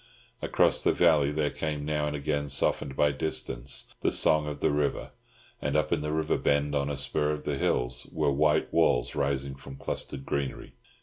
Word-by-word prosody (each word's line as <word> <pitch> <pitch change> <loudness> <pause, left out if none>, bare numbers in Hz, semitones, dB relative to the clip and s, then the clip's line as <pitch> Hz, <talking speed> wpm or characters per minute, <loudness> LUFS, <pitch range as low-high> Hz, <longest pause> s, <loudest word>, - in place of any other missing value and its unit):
Across - - +3
the - - +3
valley 75 -5 +4
there 75 -1 0
came 75 -2 -3
now 75 -1 0
and 75 - -2
again, 70 0 -2
softened 65 0 0
by 75 +1 +3
distance, 65 -3 -4
the - - +2
song 75 -1 +3
of 75 -1 -5
the - - +2
river; 75 -1 -1 0.5
and - - -1
up 75 0 +1
in - - +1
the 75 0 -2
river 80 0 0
bend, 70 0 +1
on 70 0 0
a 70 - -3
spur 75 +2 0
of 75 0 -2
the 75 - -1
hills, 60 -2 -1
were 70 - +1
white 75 +2 +2
walls 60 - +2
rising 70 -1 -1
from 65 0 -11
clustered 70 0 -5
greenery. 70 -2 -3
75 Hz, 190 wpm, -28 LUFS, 70-75 Hz, 0.5 s, valley